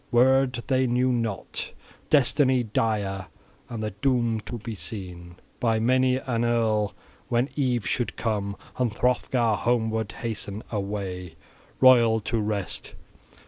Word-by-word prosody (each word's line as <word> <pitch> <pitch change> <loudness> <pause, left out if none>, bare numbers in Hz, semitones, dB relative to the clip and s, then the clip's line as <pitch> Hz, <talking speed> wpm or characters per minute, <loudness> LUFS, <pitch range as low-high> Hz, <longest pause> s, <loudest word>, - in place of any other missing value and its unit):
Wyrd 130 0 +3
they 130 -1 +2
knew 125 +1 +2
not, 115 -5 -3 0.4
destiny 130 -2 +4
dire, 100 -4 -1 0.4
and 115 -2 -4
the 105 - -2
doom 115 +1 +1
to 120 - -4
be 115 +1 -6
seen 90 -4 -7 0.2
by 115 -2 +2
many 130 +3 +3
an 120 -3 -1
earl 110 -3 +1 0.3
when 120 +3 +1
eve 125 -6 0
should 120 - -1
come, 100 -3 -2 0.2
and 125 -3 +2
Hrothgar 125 -1 +1
homeward 110 -2 0
hasten 110 -2 -4
away, 100 -4 -4 0.5
royal, 120 -3 +6
to 115 +2 -1
rest. 105 -3 -3
115 Hz, 125 wpm, -26 LUFS, 105-125 Hz, 0.5 s, royal